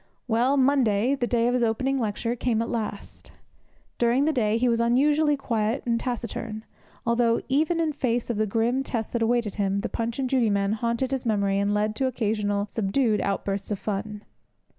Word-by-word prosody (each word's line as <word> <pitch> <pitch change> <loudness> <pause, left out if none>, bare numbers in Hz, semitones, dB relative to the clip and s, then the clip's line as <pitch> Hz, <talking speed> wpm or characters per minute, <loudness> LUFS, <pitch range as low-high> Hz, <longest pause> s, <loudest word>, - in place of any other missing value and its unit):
Well, 245 +4 +2
Monday 255 -4 +3
the 250 -3 -1
day 235 -1 +1
of 245 - +2
his 250 -1 +1
opening 260 +4 0
lecture 230 +1 -2
came 235 -2 0
at 230 - -5
last. 215 -4 -5 0.7
During 240 +4 +3
the 315 - +2
day 220 -4 +1
he 250 +2 +1
was 230 -1 +2
unusually 290 +5 +3
quiet 230 -2 -1
and 230 -1 +1
taciturn, 230 -2 -4 0.4
although, 235 0 +2
even 310 +5 +1
in 320 -2 0
face 245 -4 -1
of 225 - -3
the 215 0 +1
grim 230 +5 +1
test 230 -5 -4
that 235 - -1
awaited 230 -2 +1
him, 200 0 0
the - - -3
Punch 230 0 -3
and 270 -1 -1
Judy 250 -4 +2
men 200 0 +1
haunted 235 +3 -1
his 265 -2 -1
memory 200 -3 +1
and 200 0 +1
led 210 +1 0
to 265 - +1
occasional 210 -4 -1
subdued 215 +2 0
outbursts 195 0 -2
of 210 - -1
fun. 210 +1 -4
230 Hz, 190 wpm, -25 LUFS, 210-255 Hz, 0.7 s, Monday